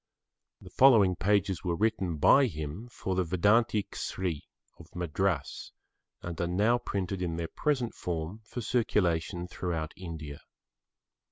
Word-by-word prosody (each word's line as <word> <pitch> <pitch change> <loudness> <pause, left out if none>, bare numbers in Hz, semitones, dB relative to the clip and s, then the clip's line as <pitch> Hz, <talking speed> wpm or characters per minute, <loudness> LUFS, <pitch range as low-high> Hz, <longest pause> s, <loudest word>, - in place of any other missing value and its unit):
The - - -13
following 110 -9 +6
pages 100 -1 +1
were 85 -2 0
written 95 -5 0
by 135 - +6
him 80 +4 -6
for 95 -5 -4
the 95 0 +1
Vedanta 105 +5 +2
Kesari 90 -7 -4 0.3
of - - -15
Madras 90 +2 -2 0.5
and 85 -1 -5
are 85 - 0
now 105 +7 +2
printed 95 -4 -3
in 85 -2 -2
their 85 0 -3
present 135 -6 -1
form 85 +4 -4
for 120 +3 -6
circulation 90 -6 0
throughout 85 -4 -4
India. 80 -5 -8
95 Hz, 135 wpm, -29 LUFS, 85-105 Hz, 0.5 s, following